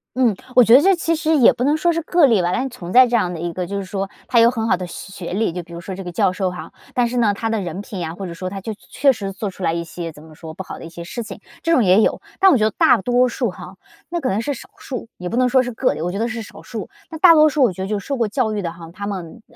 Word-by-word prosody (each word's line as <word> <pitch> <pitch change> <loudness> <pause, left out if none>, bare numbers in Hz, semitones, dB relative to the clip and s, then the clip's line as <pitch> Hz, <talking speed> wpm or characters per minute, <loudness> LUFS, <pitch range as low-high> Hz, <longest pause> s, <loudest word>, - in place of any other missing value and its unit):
嗯， 245 -5 +3 0.2
我 250 - +8
觉 230 - +5
得 275 - +8
这 385 +1 +4
其 330 -1 0
实 315 0 +1
也 245 - +6
不 245 - -3
能 295 +4 +2
说 340 +2 +2
是 335 - -1
个 340 0 +4
例 225 -8 +3
吧。 175 - 0
但 260 +7 -1
存 185 -9 -9
在 255 +3 +8
这 240 - 0
样 180 -6 +1
的 170 - -6
一 170 0 -3
个 180 0 -4
就 200 +2 -4
是 195 - -4
说 195 +1 -4 0.2
他 235 - +3
有 230 +1 +7
很 225 -2 -2
好 - - +3
的 180 0 -6
学 195 +2 -9
学 - - -4
历， 215 -1 0
就 180 - -4
比 170 0 -16
如 170 - -7
说， 190 +2 -7
这 190 +1 -7
个 175 - -6
教 175 - +2
授 185 -1 -1
哈， 165 -3 -9 0.2
但 245 -1 +2
是 245 +1 -3
呢 220 -4 +3
他 225 +2 -2
的 220 -2 -1
人 180 +2 -5
品 200 -2 -7
呀， 165 0 -4
或 195 - -6
者 170 - -6
说 185 +2 -5
他 195 0 -6
就 220 - -5
确 210 - -18
确 275 -1 +3
实 195 -4 -5
做 200 0 -4
出 190 - -14
来 165 - +2
一 170 0 -2
些 170 0 -6
怎 150 0 -15
么 160 -1 -15
说， 160 0 -10
不 190 - -6
好 - - -9
的 - - -9
一 165 - -8
些 170 0 -9
事 235 +7 -6
情， - - -9 0.2
这 330 - 0
种 255 -9 +4
也 190 +3 +5
有。 - - +1 0.2
但 385 -1 +7
我 275 - +5
觉 215 - +1
得 220 - -2
大 - - +5
多 250 +3 +3
数 240 -2 -1
哈 180 +1 -11 0.3
那 345 - -2
可 260 - -1
能 200 +3 0
是 285 +5 -2
少 - - -12
数， 250 -4 -6
也 180 0 -5
不 230 - -2
能 255 - +4
说 255 +1 +4
是 245 - -4
个 250 +3 0
例， - - -6
我 175 +2 -2
觉 195 - -4
得 230 - 0
是 240 -1 -4
少 210 - -11
数， 225 -3 -7 0.2
那 320 - -6
大 335 0 +8
多 310 0 +7
数 300 -1 0
我 240 - +4
觉 190 - -8
得 - - -3
就 210 -1 -1
是 - - -12
受 275 - -1
过 230 -3 +1
教 220 0 -1
育 205 - -2
的 170 - -3
哈， 170 -1 -11
他 200 +1 -6
们 190 +1 -6
215 Hz, 375 characters per minute, -20 LUFS, 180-250 Hz, 0.3 s, 我